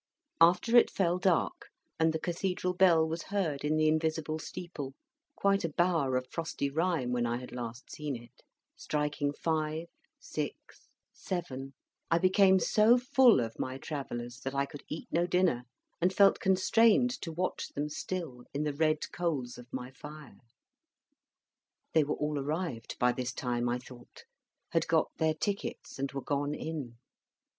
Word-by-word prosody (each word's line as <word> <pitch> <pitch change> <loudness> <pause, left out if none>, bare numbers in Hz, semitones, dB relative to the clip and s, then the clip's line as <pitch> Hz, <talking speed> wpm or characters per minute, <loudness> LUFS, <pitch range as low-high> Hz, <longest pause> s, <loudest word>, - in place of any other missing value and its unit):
After 180 +8 +5
it 240 - +7
fell 180 -2 +1
dark, 185 -3 +1 0.3
and 160 0 +4
the 160 - -1
Cathedral 180 +2 -1
bell 175 -3 +5
was 165 +1 -4
heard 175 -9 -1
in 150 +1 +1
the 155 0 +3
invisible 155 0 0
steeple 150 -5 -7 0.4
quite 200 -1 +2
a 165 - 0
bower 155 -5 +2
of 130 - -2
frosty 160 -4 -2
rime 160 -5 0
when 120 -1 +1
I 120 +1 -1
had 125 0 -9
last 120 0 -7
seen 150 -3 -4
it 120 -1 -13 0.3
striking 150 -1 -1
five, 155 +1 -1 0.3
six, - - -6 0.3
seven, 135 -8 -5 0.3
I 165 - +4
became 190 +2 +5
so 215 +6 +5
full 250 - +5
of 115 -1 -5
my 130 0 -3
Travellers 120 -5 -5
that 135 0 -5
I 140 0 +2
could 140 +1 -10
eat 155 - -5
no 170 +2 +2
dinner, 180 -9 +2 0.4
and 180 +2 +3
felt 195 +1 +5
constrained 225 +5 +4
to 165 - -4
watch 180 +3 -2
them 145 +1 -3
still 150 -5 -5
in 145 - 0
the 150 -1 -1
red 155 +1 +1
coals 140 -9 -2
of 125 0 -13
my 125 +1 -5
fire. 150 +2 -11 1.5
They 160 - +5
were 145 - -1
all 150 -1 -1
arrived 145 -4 -3
by 125 0 +3
this 125 0 -3
time, 120 -1 -1
I 120 - +1
thought, 125 -1 -14 0.5
had - - +1
got - - +2
their 160 -1 +2
tickets, 200 -4 -4
and 140 0 -2
were 135 -1 -5
gone 145 +1 -1
in. 145 -9 -5
155 Hz, 160 wpm, -31 LUFS, 135-180 Hz, 1.5 s, it